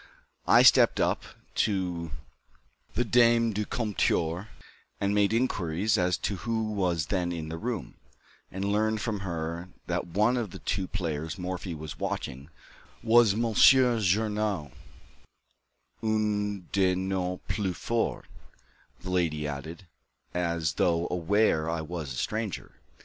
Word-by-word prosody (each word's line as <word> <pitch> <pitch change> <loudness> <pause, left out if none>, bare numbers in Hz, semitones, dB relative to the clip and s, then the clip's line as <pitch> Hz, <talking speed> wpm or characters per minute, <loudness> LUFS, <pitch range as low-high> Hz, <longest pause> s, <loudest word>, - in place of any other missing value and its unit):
I - - +7
stepped - - +6
up - - +1 0.4
to 90 -5 0 0.9
the 120 - +1
dame 115 -1 +4
du 105 +1 -2
comptoir 95 -5 0 0.5
and 100 +1 0
made 105 0 +3
inquiries 105 -4 +1
as 90 -3 +1
to 100 - -1
who 110 +1 -2
was 90 -6 0
then 90 -2 0
in 80 -2 -5
the 80 - -4
room, 115 -3 -4 0.6
and 95 +1 -3
learned 110 +2 +1
from 105 -2 -2
her 85 -1 -4 0.2
that - - -2
one 105 +8 +2
of 115 -4 -2
the - - -9
two 95 -2 -2
players 80 -3 -3
Morphy 90 -1 -4
was 75 -4 -8
watching 70 +3 -4 0.5
was 115 -3 +5
Monsieur 120 +2 +5
Journoud, 105 - 0 1.3
"un 105 -3 0
de 95 -2 +3
nos 95 -1 -2
plus 95 -2 -2
forts," 115 -1 -1 0.7
the 95 - -6
lady 80 -5 0
added, 80 +6 -7 0.5
as 85 -4 -1
though 85 +1 +1
aware 90 -2 +2
I 85 -1 -1
was 80 -3 -5
a - - -5
stranger. 105 - -3
95 Hz, 130 wpm, -28 LUFS, 85-110 Hz, 1.3 s, I